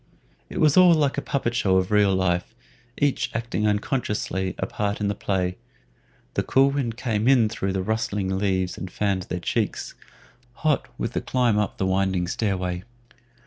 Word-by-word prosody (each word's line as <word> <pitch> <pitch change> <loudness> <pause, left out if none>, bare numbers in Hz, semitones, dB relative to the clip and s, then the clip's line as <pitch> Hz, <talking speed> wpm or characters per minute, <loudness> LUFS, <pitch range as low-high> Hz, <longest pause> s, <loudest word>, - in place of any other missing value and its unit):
It - - -5
was 150 0 +4
all 180 -2 +8
like 145 -2 +1
a - - -6
puppetshow 120 -9 +1
of 95 +1 0
real 105 -2 +4
life, 95 +3 0 0.4
each 145 -2 +1
acting 115 -2 -1
unconsciously 105 -4 -1
a - - -1
part 105 0 -2
in 105 -1 0
the - - 0
play. 90 -2 -1 0.8
The - - +1
cool 135 +1 +3
wind 125 -5 -2
came 110 -3 -1
in 125 -5 +5
through 95 -3 -2
the 95 -1 -1
rustling 105 -3 -1
leaves 95 -2 0
and 95 - -5
fanned 95 -1 -1
their 90 - -2
cheeks, 85 - -2 0.6
hot 155 +1 0
with - - -3
the - - -1
climb 120 -5 +1
up 105 - -2
the 95 - 0
winding 95 -1 +1
stair 100 +1 -1
way. 90 -1 -3
105 Hz, 175 wpm, -24 LUFS, 95-120 Hz, 0.8 s, all